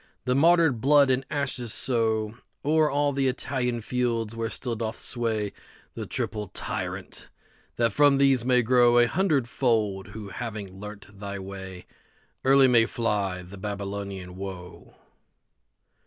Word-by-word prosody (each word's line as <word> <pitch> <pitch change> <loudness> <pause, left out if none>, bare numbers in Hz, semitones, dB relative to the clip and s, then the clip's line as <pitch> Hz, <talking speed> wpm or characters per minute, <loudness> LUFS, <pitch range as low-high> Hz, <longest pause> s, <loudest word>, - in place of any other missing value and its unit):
Their 125 - +2
martyred 160 -4 +4
blood 140 0 +5
and 130 +1 +1
ashes 130 -5 -2
sowO'er 115 +7 0
all 145 0 +1
the 135 0 +1
Italian 125 -2 -1
fields, 115 -2 -1
where 115 0 -2
still 120 +1 -4
doth 110 0 -4
swayThe 110 -4 -2 0.6
triple 105 -2 -3
Tyrant; - - -5 0.5
that 115 -3 +1
from 145 -1 +5
these 135 -3 +4
may 125 0 +3
growA 120 0 +5
hundredfold, 120 - +1
who, 105 -1 -8
having 105 -4 -6
learnt 100 -1 -10
thy 100 0 -5
way, 95 -1 -8 0.6
Early 135 0 +6
may 115 -3 +4
fly 100 -6 -1
the 95 +2 -11
Babylonian 100 -2 -5
woe. 95 -2 -8
115 Hz, 125 wpm, -26 LUFS, 100-130 Hz, 0.6 s, Early